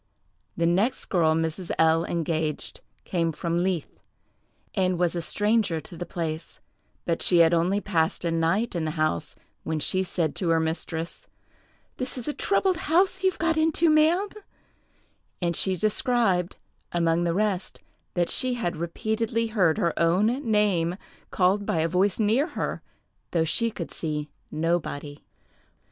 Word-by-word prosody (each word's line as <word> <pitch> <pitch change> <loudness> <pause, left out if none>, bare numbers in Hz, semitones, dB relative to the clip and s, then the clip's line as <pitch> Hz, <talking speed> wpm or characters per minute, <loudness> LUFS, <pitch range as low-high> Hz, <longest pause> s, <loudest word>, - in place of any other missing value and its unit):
The 170 - +1
next 190 +9 +1
girl 160 -4 +3
Mrs. 165 +2 -2
L—— 160 +1 +3
engaged 160 -2 -2 0.2
came 165 -2 0
from 170 +2 -1
Leith, 180 -4 -2 0.7
and 185 -1 +1
was 175 0 +1
a 170 - -1
stranger 205 -1 +1
to 170 - -11
the 175 +1 -6
place; 160 -1 -5 0.5
but 165 -1 -1
she 175 - +4
had 165 0 +6
only 175 +4 +2
passed 170 -4 0
a 170 - +1
night 165 +8 +1
in 170 -3 -2
the 155 +1 -4
house, 155 - -1 0.3
when 160 -1 -2
she 185 +5 +1
said 170 -4 -1
to 180 - -1
her 165 0 +4
mistress, 160 +1 -3 0.7
"This 255 0 -4
is 245 - -5
a 295 - -1
troubled 380 0 +1
house 370 +4 +2
you've 375 -1 +2
got 325 -1 +1
into, 320 +1 +3
ma'am;" 325 +6 +3 1.1
and 170 -2 0
she 190 -1 +3
described, 215 -4 +1 0.4
among 170 0 +1
the 170 -1 0
rest, 200 -2 0 0.4
that 175 -1 +1
she 255 -1 +2
had 175 -8 -2
repeatedly 220 +7 -1
heard 180 -7 +3
her 170 - +1
own 170 +5 +3 0.2
name 190 -5 +2 0.3
called 195 +2 +2
by 185 - -1
a 165 - +2
voice 185 +5 +1
near 225 +8 +2
her, - - -2 0.5
though 165 -2 +1
she 230 +8 +1
could 185 -7 -7
see 150 -2 -4 0.2
nobody. 155 -3 -2
175 Hz, 155 wpm, -26 LUFS, 165-215 Hz, 1.1 s, had